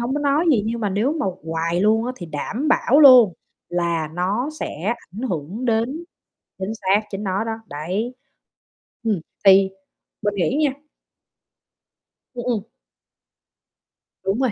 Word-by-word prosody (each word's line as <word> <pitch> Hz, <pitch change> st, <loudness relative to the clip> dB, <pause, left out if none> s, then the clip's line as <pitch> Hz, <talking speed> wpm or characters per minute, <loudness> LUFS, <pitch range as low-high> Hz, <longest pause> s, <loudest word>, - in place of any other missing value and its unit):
hông 240 Hz, +3 st, -1 dB
có 295 Hz, -, -1 dB
nói 290 Hz, +3 st, +2 dB
gì 230 Hz, -8 st, +3 dB
nhưng 230 Hz, +1 st, -2 dB
mà 210 Hz, -, 0 dB
nếu 220 Hz, +9 st, +1 dB
mà 305 Hz, -7 st, -2 dB, 0.2 s
hoài 165 Hz, +2 st, -1 dB
luôn 220 Hz, +3 st, +3 dB
á 255 Hz, -, -2 dB
thì 175 Hz, -, -8 dB
đảm 225 Hz, -, -3 dB
bảo 285 Hz, -1 st, +4 dB
luôn 250 Hz, -8 st, +9 dB, 0.4 s
là 170 Hz, -3 st, -1 dB
nó 200 Hz, +10 st, -1 dB
sẽ 195 Hz, +10 st, -2 dB, 0.2 s
ảnh 215 Hz, -, -7 dB
hưởng 180 Hz, -, -4 dB
đến 240 Hz, +8 st, 0 dB, 0.5 s
chính 190 Hz, +3 st, -3 dB
xác, 200 Hz, -1 st, +2 dB
chính 195 Hz, 0 st, -5 dB
nó 195 Hz, +2 st, -1 dB
đó, 225 Hz, -, -2 dB
đấy. 185 Hz, -, -3 dB, 0.9 s
Ừm, 210 Hz, -7 st, +1 dB, 0.2 s
thì 195 Hz, 0 st, +7 dB, 0.5 s
mình 205 Hz, -1 st, 0 dB
nghĩ 200 Hz, -, 0 dB
nha 285 Hz, -, +2 dB, 1.6 s
Ừm, 240 Hz, -1 st, -5 dB
ừm. 230 Hz, -5 st, 0 dB, 1.6 s
Đúng 195 Hz, +4 st, 0 dB
rồi. 255 Hz, -4 st, +2 dB
210 Hz, 150 wpm, -22 LUFS, 185-245 Hz, 1.6 s, luôn